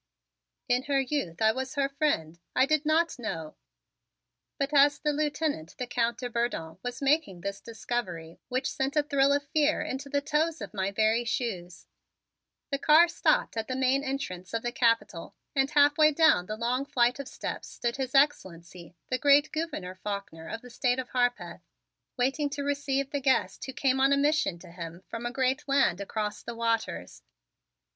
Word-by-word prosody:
In 250 +1 +1
her 280 -1 +2
youth 250 - -2
I 220 - +6
was 260 +3 -5
her 280 -1 +2
friend. 275 - -1 0.2
I 260 - +5
did 310 +1 +1
not 320 -2 +2
know 160 -9 -5 0.5
" - - -58
but 280 +1 -2
as 285 0 +6
the 300 -1 -1
Lieutenant, 295 - -2
the 250 - -3
Count 235 -1 0
de 250 - -4
Bourdon, 235 -9 -3
was 245 +4 -5
making 275 - +1
this 200 +1 -5
discovery 210 -8 -5
which 255 +1 -1
sent 270 +2 -2
a 300 - +3
thrill 280 -1 +2
of 285 0 +2
fear 305 0 +2
into 275 +2 -5
the 285 0 +1
toes 310 +3 0
of - - -7
my 190 -1 -1
very 220 +3 +2
shoes, 185 -8 -4 0.9
the 275 - -1
car 310 +4 +6
stopped - - +1
at 225 -1 -3
the 255 - -3
main 265 +1 +2
entrance 230 -9 -4
of 230 - -2
the 240 - -1
Capitol 230 -8 0 0.2
and 270 0 +2
halfway 295 +1 +5
down 305 - +4
the 215 - -4
long 245 +4 0
flight 250 -3 +1
of 280 - -5
steps - - -6
stood 235 +1 -3
His 265 0 -3
Excellency, 180 - 0
the 255 - 0
great 285 +1 +5
Gouverneur 310 - -4
Faulkner 185 -4 -6
of 225 - -6
the 250 - -12
State 245 +1 +1
of 260 -1 -4
Harpeth, 245 -1 -1 0.6
waiting 270 +4 +1
to 280 0 -4
receive 275 -1 -1
the 285 -2 -2
guest 260 -3 +1
who 265 - -6
came 265 0 +1
on 270 +1 +4
a 280 - +4
mission 295 - +1
to 170 - -14
him 170 +1 -8
from 230 +1 -5
a - - -4
great 260 +1 0
land 270 -10 +2
across 210 +1 -3
the 235 - -7
waters. 230 -1 -2
255 Hz, 185 wpm, -28 LUFS, 220-285 Hz, 0.9 s, I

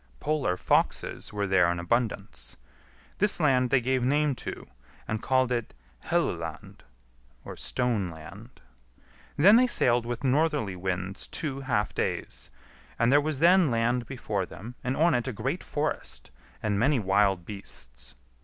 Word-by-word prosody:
Polar 145 -12 0
foxes - - 0
were 105 -1 -2
there 95 -3 +3
in 85 - -2
abundance. 85 - -2 0.6
This 205 -2 +3
land 130 -5 +3
they 130 0 +3
gave 130 +1 0
name 145 +3 +2
to, - - -7 0.4
and 110 -1 -2
called 130 -1 +2
it 120 - -2 0.3
Helluland - - -2 0.8
(stone 120 -7 -1
land). 95 +9 -12 0.8
Then 200 +9 +7
they 250 +1 +5
sailed 120 - +2
with 120 +1 -4
northerly 140 - +1
winds 95 +1 -4
two 140 -4 -3
half 120 -7 -1
days, - - -3 0.5
and 115 +2 +3
there 145 +1 +6
was 155 -1 -2
then 175 +1 +5
land 120 0 0
before 110 -7 -3
them, 115 +5 -9
and 125 +1 -1
on 165 +1 +4
it 120 +1 0
a - - -1
great 105 - -3
forest - - -4 0.3
and 105 -2 0
many 140 +5 +3
wild 95 -3 +2
beasts. 65 - -10
120 Hz, 145 wpm, -27 LUFS, 100-135 Hz, 0.8 s, Then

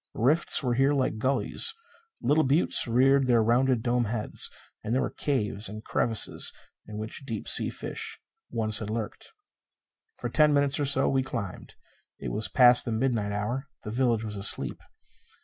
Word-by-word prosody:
Rifts 150 +5 +2
were 125 -2 0
here 135 +4 +2
like 130 -6 -1
gulleys; 135 - +1 0.5
little 155 +2 +3
buttes 140 +1 +2
reared 130 +3 +3
their 120 -3 +3
rounded, 120 +1 +1
dome 120 0 0
heads. 110 0 -3 0.3
And 115 - -2
there 130 - +1
were - - -3
caves 105 -7 -2
and 110 +1 -9
crevices 115 -2 +1 0.4
in 105 0 -8
which 110 +5 -7
deep 115 -5 -6
sea - - +5
fish - - -7 0.3
once 110 -2 -1
had 105 - -6
lurked. 110 -1 -6 0.9
For - - -4
ten 150 -1 +3
minutes 140 0 +1
or 145 - 0
so 135 -1 +2
we 135 -1 +1
climbed. 115 -7 -7 0.4
It - - -6
was 110 - -2
past 125 -1 +6
the 115 - -3
midnight 110 -3 -1
hour; 120 +8 -3 0.2
the 105 - -6
village 120 -2 0
was 105 -2 -5
asleep. 100 - +2
120 Hz, 165 wpm, -27 LUFS, 110-135 Hz, 0.9 s, past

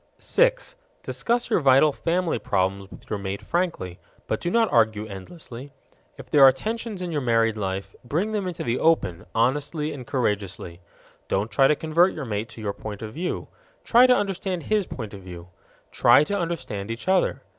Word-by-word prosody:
6. - - +1 0.3
Discuss 240 +1 -1
your - - +4
vital 140 +1 +5
family 170 -1 -1
problems 95 -1 -1
with - - -14
your 105 - -3
mate 100 0 -5
frankly, 170 - -2 0.3
but - - -2
do 175 - -1
not 230 +2 +2
argue 110 -3 +3
endlessly. 120 - -9 0.4
If - - -11
there 150 - +5
are 135 - +10
tensions 215 - -4
in 175 - -4
your 150 -3 -1
married 115 -3 +2
life, 95 -1 -4
bring 165 - -1
them 205 -3 -2
into 180 - -4
the 120 +1 -1
open, 100 - +1
honestly 145 +6 0
and 130 -4 -9
courageously. 100 -8 -2 0.5
Don't 105 +3 -1
try 135 +6 +5
to 150 - +3
convert 165 +5 +2
your 150 - -5
mate 105 -1 -3
to 115 - -11
your 100 -2 -2
point 105 0 -7
of 110 0 -7
view; 175 +6 -3 0.4
try 245 +2 +6
to 250 - +6
understand 190 -4 -2
his 210 -3 0
point 110 -5 -7
of 100 - -9
view. 90 -1 -10 0.4
Try 120 +4 +5
to 200 +7 -2
understand 165 - -3
each 115 +8 -6
other. 190 -1 +2
135 Hz, 185 wpm, -24 LUFS, -, 0.5 s, are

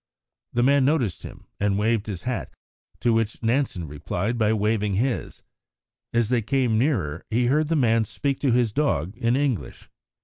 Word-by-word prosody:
The 120 - +2
man 140 +1 +4
noticed 130 - +1
him - - -11
and 100 -1 +1
waved 110 0 +1
his 95 -5 -5
hat, 125 -1 -3 0.5
to 120 - +3
which 115 0 -1
Nansen 115 - 0
replied 90 +10 -3
by 110 -2 +2
waving 105 -2 +1
his; 120 +4 -2 0.7
as 115 -2 +1
they 125 -2 +2
came 125 0 +1
nearer, 95 - 0
he 120 +2 +1
heard 150 +5 +2
the 165 - +1
man 115 -5 +3
speak 140 +5 -2
to 135 - +1
his 120 -2 +2
dog 110 - 0
in 115 +1 +1
English. 130 - -2
115 Hz, 170 wpm, -24 LUFS, 105-130 Hz, 0.7 s, man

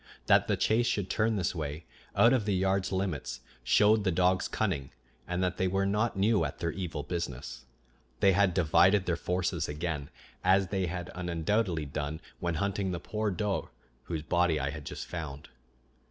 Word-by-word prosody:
That - - +5
the - - +1
chase 115 +2 +2
should 100 -5 -1
turn 110 +1 +1
this 90 -4 0
way, 75 -1 -5 0.3
out 120 +2 +6
of 120 -6 +1
the 105 -2 +1
yard's 95 +1 +1
limits 85 -9 -2 0.2
showed 105 +1 +4
the 95 - +2
dogs' 90 +1 +2
cunning, 85 -11 -1 0.4
and 90 +1 -1
that 90 - -1
they 95 - +1
were 95 +1 +1
not 105 +2 0
new 105 +2 +3
at - - -3
their 85 - -1
evil 85 -6 -4
business. 65 -6 -5 0.5
They 100 - +5
had 95 -2 +3
divided 95 +3 +4
their 85 - +1
forces 90 -2 -1
again, 75 -1 -3 0.3
as 95 0 +4
they 95 -3 0
had 90 0 -5
undoubtedly 90 0 0
done 75 +2 -4 0.2
when 85 -1 -1
hunting 100 +3 -1
the 90 - -3
poor 105 +4 -2
doe 100 +1 -2 0.4
whose 80 -3 -3
body 85 -1 +2
I 70 0 -1
had 75 -1 -8
just - - -6
found. 75 -5 -6
90 Hz, 180 wpm, -30 LUFS, 80-100 Hz, 0.5 s, out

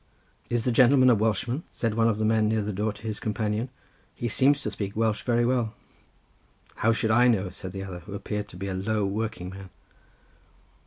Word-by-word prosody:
"Is 120 -1 0
the 125 - +2
gentleman 130 +1 +6
a - - +7
Welshman?" 115 - 0
said 115 -2 -2
one 115 +1 +3
of 110 - 0
the 110 - 0
men, 110 0 +3
near 110 -1 +1
the 105 +1 -3
door, 105 +3 -1
to 105 - -13
his 110 -2 -4
companion; 110 +2 -2 0.5
"he 120 - -3
seems 140 +5 +3
to - - -2
speak 100 -1 -4
Welsh 110 -1 +1
very 120 -1 +2
well." 120 -3 0 1.0
"How 115 - +3
should 110 -1 +1
I 120 +2 +5
know?" 100 -6 +1
said 95 0 -7
the 95 +1 -5
other, 95 -2 -7
who 100 +4 -9
appeared 105 +1 -4
to 90 - -12
be 100 +2 -4
a 95 - -2
low 105 +2 0
working 100 -2 -3
man. 95 0 -10
110 Hz, 210 wpm, -26 LUFS, 100-115 Hz, 1.0 s, a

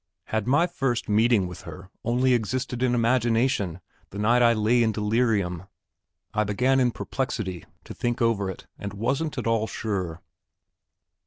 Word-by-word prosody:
Had 110 0 -1
my 145 +6 +4
first 135 -8 -2
meeting 110 -1 +3
with 90 - -9
her 95 +1 -10
only 125 +2 +2
existed 125 +2 -1
in 125 -1 +2
imagination 115 -5 +1 0.3
the 100 - -9
night 115 +4 +3
I 120 -1 +6
lay 115 +2 +2
in 110 -1 +3
delirium? 105 -5 0 0.7
I 105 - +2
began 125 +6 +2
in 125 -1 +3
perplexity 110 - -4 0.2
to - - -9
think 120 -1 -2
over 115 -5 +1
it, 95 - -8
and 100 -1 -5
wasn't 140 +8 -1
at 125 - -3
all 115 -1 +1
sure. 90 -8 -3
115 Hz, 155 wpm, -25 LUFS, 100-125 Hz, 0.7 s, I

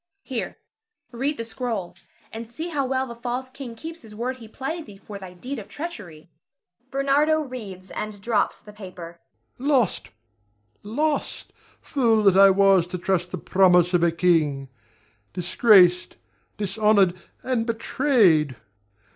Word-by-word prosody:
Here! 255 -4 -4 0.5
read 270 +5 -2
the 230 - -4
scroll, 225 -6 -4 0.4
and 225 0 -7
see 320 +8 -6
how 280 -5 -1
well 260 0 0
the 240 - -8
false 245 +2 -5
king 265 -3 -8
keeps 325 +7 -8
his 215 -2 -13
word 250 +4 -3
he 230 -3 -12
plighted 300 +8 -5
thee 200 - -12
for 200 0 -10
thy 185 -2 -10
deed 255 +8 -6
of 205 - -10
treachery. 205 - -8 0.6
Ber. 275 +1 -2 0.4
[reads, 195 -7 -8
and 210 -1 -5
drops 210 +1 -1
the 210 - -13
paper]. 180 -4 -10 0.4
Lost! 265 -6 +1 0.7
lost! 290 +8 -2 0.3
Fool 230 -6 +2
that 195 -2 +5
I 195 0 +8
was 195 -2 +4
to 180 - -5
trust 180 -1 -1
the 185 - -5
promise 180 0 +3
of 175 - +3
a 170 -1 +3
king! 155 -6 +1 0.6
Disgraced, 180 0 +4 0.4
dishonored, 205 -2 +3 0.3
and 250 -3 -1
betrayed! 225 - +2
215 Hz, 140 wpm, -24 LUFS, 185-255 Hz, 0.7 s, I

